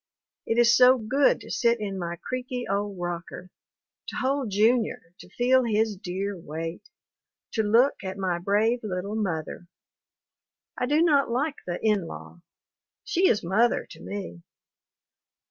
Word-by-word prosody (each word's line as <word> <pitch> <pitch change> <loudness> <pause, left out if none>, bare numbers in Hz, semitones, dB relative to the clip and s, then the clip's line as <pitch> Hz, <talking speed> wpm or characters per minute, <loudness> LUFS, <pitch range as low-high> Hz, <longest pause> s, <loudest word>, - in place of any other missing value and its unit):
It 225 - 0
is 235 -1 +6
so 255 +1 +7
good 260 +5 +2
to - - -10
sit 235 -1 +2
in 200 -2 -4
my 170 -1 -3
creaky 250 +3 -4
old 200 0 -2
rocker, 175 +1 -6 0.6
to - - -6
hold 270 -2 -1
Junior, 215 -3 +1
to - - -13
feel 255 +5 +3
his 220 -2 +1
dear 195 +2 -4
weight; 165 - -7 0.6
to 225 - 0
look 230 +4 +3
at 190 0 -5
my 185 -3 -1
brave 210 +6 +1
little 195 -1 -4
mother. 175 -5 -3 1.1
I 250 - -2
do 300 +4 +3
not 285 -6 +3
like 275 +5 -1
the 175 0 -3
"in 205 -5 +2
law." 175 - -10 0.6
She 350 +2 +2
is 210 - +2
mother 215 +8 +2
to - - -12
me. 195 -4 -7
215 Hz, 145 wpm, -26 LUFS, 185-250 Hz, 1.1 s, so